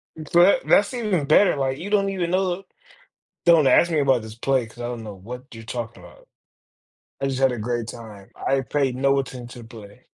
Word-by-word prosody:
That 175 - +3
that's 205 +5 +3
even 210 - -1
better, 175 +5 +4
like, 135 -1 -1
you 185 +6 -6
don't 200 -1 +2
even 180 -3 -2
know 185 0 0 0.8
"Don't 165 -5 +6
ask 170 +6 +4
me 155 - +2
about 135 -4 +2
this 110 0 -10
play, 130 0 0
'cause 115 +2 -18
I 120 - -4
don't 120 -2 -6
know 105 -2 -7
what 125 +7 -9
you're 115 0 -10
talking 115 -4 -6
about. 90 - -17 0.9
I 135 - -1
just 135 -1 -2
had 135 - +4
a 120 - -5
great 120 +1 -3
time, 105 -5 -11
I 135 0 0
paid 135 -2 -1
no 135 +1 +2
attention 125 -2 -6
to 115 - -14
play." 110 0 -14
130 Hz, 205 wpm, -23 LUFS, 115-170 Hz, 0.9 s, Don't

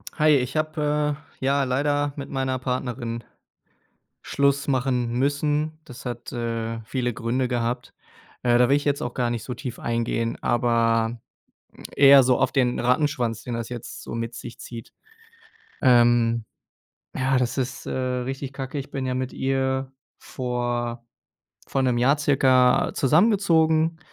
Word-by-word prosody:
Hi, 155 0 +3
ich 130 +2 -1
habe, 150 -1 0 0.3
äh, - - -2
ja 140 0 +2
leider 145 +2 0
mit 140 - -7
meiner 130 -1 -1
Partnerin 125 -2 -3 1.0
Schluss 140 +1 +1
machen 125 -3 0
müssen. 145 +4 0
Das 125 0 -11
hat, 120 -1 -6
äh, 115 -1 -3
viele 125 +1 -2
Gründe 125 +3 -1
gehabt. 120 0 -2 0.5
Äh, 120 -1 +4
da 125 0 +4
will 140 - +5
ich 145 - -1
jetzt 145 -1 +1
auch 120 - -3
gar 120 -1 0
nicht 120 -2 -3
so 125 - -5
tief 125 -2 -7
eingehen, 115 0 -1
aber 115 -1 +1 0.8
eher 140 -1 +8
so 125 -1 +3
auf - - +2
den 125 -2 +1
Rattenschwanz, 125 -3 0
den 125 - -5
das 115 -1 -4
jetzt 120 -2 -7
so - - -6
mit 115 0 -4
sich 120 +1 -9
zieht. 115 -2 -9 0.9
Ähm, 120 -2 +4 0.7
ja, 130 0 +1
das 125 +1 -1
ist, 130 0 -3
äh, - - -4
richtig 130 +1 -3
Kacke. 135 +1 -5
Ich 135 - -6
bin 135 -1 -3
ja 130 - -1
mit 130 0 -3
ihr 130 0 -1 0.3
vor 120 -1 -3 0.7
vor 135 - 0
1 125 -2 +1
Jahr 135 +4 +4
circa 130 -3 +3
zusammengezogen. 160 - +3
130 Hz, 150 wpm, -24 LUFS, 120-140 Hz, 1.0 s, eher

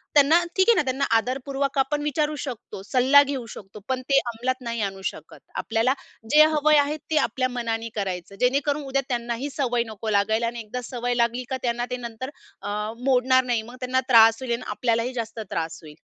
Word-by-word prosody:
त्यांना, 305 +4 +6
ठीक 380 +3 +3
आहे 465 - +7
ना - - +3
त्यांना 270 +1 -1
आदरपूर्वक 270 +3 -2
आपण 290 +2 +1
विचारू 300 +1 0
शकतो, 240 -7 -7
सल्ला 260 +6 +5
घेऊ 270 -3 -4
शकतो, 200 +1 -11
पण 260 -1 0
ते 275 - +5
अंमलात 245 +2 -2
नाही 235 -2 -3
आणू 195 -1 -3
शकत. 155 - -13 0.2
आपल्याला 230 +3 +1 0.4
जे 305 +1 +8
हवं 305 -1 +3
आहे 290 +2 0
ते 310 - +2
आपल्या 255 -1 -1
मनाने 230 -2 -3
करायचं, 195 -2 -4
जेणेकरून 280 +3 +1
उद्या 275 0 0
त्यांनाही 240 +2 -2
सवय 245 -4 +1
नको 220 0 -6
लागायला. 220 +3 +2
आणि 235 0 -5
एकदा 235 +4 -6
सवय 245 0 -2
लागली 240 +1 +1
का 265 - -1
त्यांना 240 0 0
ते 250 - -1
नंतर 240 +2 -6 0.3
अ, 210 +2 -3
मोडणार 260 0 +4
नाही. 240 -3 0
मग 240 +3 -11
त्यांना 255 +1 +1
त्रास 225 -1 +7
होईल 250 -2 -2
आणि 235 - -3
आपल्यालाही 235 +1 0
जास्त 230 -2 -5
त्रास 165 0 -3
होईल. 150 -1 -12
245 Hz, 195 wpm, -24 LUFS, 225-270 Hz, 0.4 s, जे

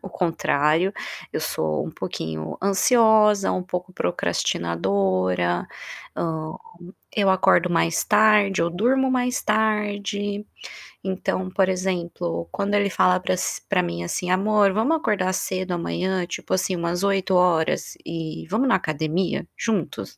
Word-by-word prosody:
o 195 - -7
contrário, 165 0 +1 0.4
eu - - -2
sou 80 -1 -1
um - - -5
pouquinho 80 0 -5
ansiosa, 210 0 +4
um 185 - -1
pouco 180 0 -5
procrastinadora, 90 - 0 0.5
hã, 160 -1 -3 0.6
eu 200 -2 +3
acordo 180 -1 +3
mais 165 -1 +1
tarde, 210 -3 +4
eu 170 - +2
durmo 250 +10 +1
mais 250 -1 0
tarde, 205 -1 -1 0.6
então, 190 0 -2
por 190 0 +2
exemplo, 175 - -2
quando 200 +1 -2
ele 205 -1 +2
fala 180 -1 +3
para 95 - 0
as - - -2
pra - - +2
mim, 85 0 -4
assim: 180 - -2
"Amor, 200 +1 +3
vamos 240 +11 +2
acordar 195 -10 0
cedo 185 0 -2
amanhã, 180 +1 -1
tipo 175 - -5
assim, 185 0 0
umas 170 +2 -2
8h 195 -1 +1 0.7
e 165 -1 -5
vamos 225 +8 +1
na 255 - +3
academia 160 +1 -1
juntos?" 195 - -3
185 Hz, 130 wpm, -23 LUFS, 160-205 Hz, 0.7 s, ansiosa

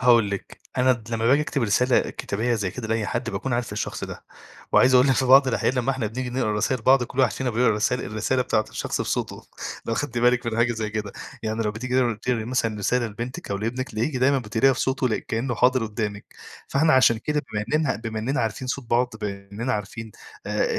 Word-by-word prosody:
هاقول 120 -4 +5
لِك، 100 - -6 0.2
أنا 130 0 +5
د 115 -2 -7
لمّا 115 0 0
باجي 140 +5 +5
أكتب 140 -3 -2
رسالة 120 +4 +2
كتابية 115 +4 -1
زي 100 -5 -1
كده 110 +1 -6
لأي 110 -2 0
حد 120 0 -2
باكون 130 - -3
عارف 120 -2 -1
الشخص 105 - -3
ده، - - -9 0.5
وعايز 130 0 +5
أقول 125 +2 +6
لِك - - +5
في 130 - +1
بعض 135 +1 +7
الأحيان 130 +1 +1
لمّا 125 +1 +1
إحنا 130 -5 -1
بنيجي 125 +3 -4
نقرا 120 -4 0
رسايل 110 +3 0
بعض، 130 +2 +5
كُلّ 125 - -10
واحد 130 - +3
فينا 130 -1 -2
بيقرا 120 +2 +2
الرسالة 110 +4 0
الرسالة 120 +4 0
بتاعة 110 -2 +1
الشخص - - -3
بصوته، - - -2 0.4
لو 115 - 0
خدتي 120 -2 -2
بالِك 125 0 +3
من 115 -1 -1
حاجة 120 0 +3
زي 110 -2 -3
كده، 105 -1 -4 0.3
يعني 110 +1 -1
لو 105 - 0
بتيجي 125 +4 -4
تقر 120 -3 +2
تقري 115 +1 -2
مثلًا 115 -3 -1
رسالة 120 +4 +1
لبنتِك 120 +4 -6
أو 100 - 0
لابنِك 120 +5 -3
تلاقيكِ 120 +6 -1
دايمًا 135 +2 +3
بتقريها 120 +3 +2
بصوته 130 -2 0
كأنه 120 +2 -2
حاضر 125 +1 +3
قُدّامِك، 105 -1 -4 0.4
فإحنا 155 +3 +3
عشان 130 -3 +5
كده 150 +5 -1
بما 105 -1 -1
إننا 155 -4 +2
بما 110 0 -5
إننا 125 +5 -1
عارفين 115 +3 -3
صوت 135 0 -3
بعض، 120 +1 +3
بما 100 -1 -5
إننا 120 +5 -2
عارفين 105 +1 -5 0.3
آآ - - +1
120 Hz, 220 wpm, -24 LUFS, 110-130 Hz, 0.5 s, بعض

